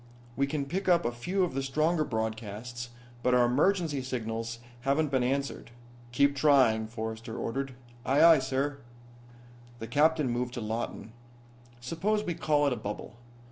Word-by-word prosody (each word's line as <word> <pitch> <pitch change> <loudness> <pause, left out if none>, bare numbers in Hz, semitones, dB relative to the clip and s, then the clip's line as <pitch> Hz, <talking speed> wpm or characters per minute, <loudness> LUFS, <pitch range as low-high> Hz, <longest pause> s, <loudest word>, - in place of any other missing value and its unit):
"We 140 +1 +1
can 140 0 -2
pick 185 +7 -2
up 170 -1 +4
a 120 - +1
few 180 +12 -1
of 175 - -1
the 135 - -1
stronger 155 +4 +1
broadcasts, 115 0 -4 0.3
but 125 0 +3
our 125 -1 +5
emergency 155 +3 +2
signals 115 -2 -4 0.2
haven't 140 +3 +1
been 130 -2 +2
answered." 135 +2 -2 0.4
"Keep 140 +3 +3
trying," 130 -7 +4
Forrester 110 0 -6
ordered. 135 +2 -3 0.3
"Aye, 135 +4 +3
aye, 165 -3 +8
sir." 135 +2 -1 1.0
The 115 - -6
captain 145 +1 +2
turned 125 0 -2
to 120 - -4
Lawton. 110 0 -4 0.7
"Suppose 190 - -1
we 175 - -2
call 150 -3 +1
it 140 - +2
a - - -4
bubble. 105 0 -6
135 Hz, 155 wpm, -29 LUFS, 120-150 Hz, 1.0 s, aye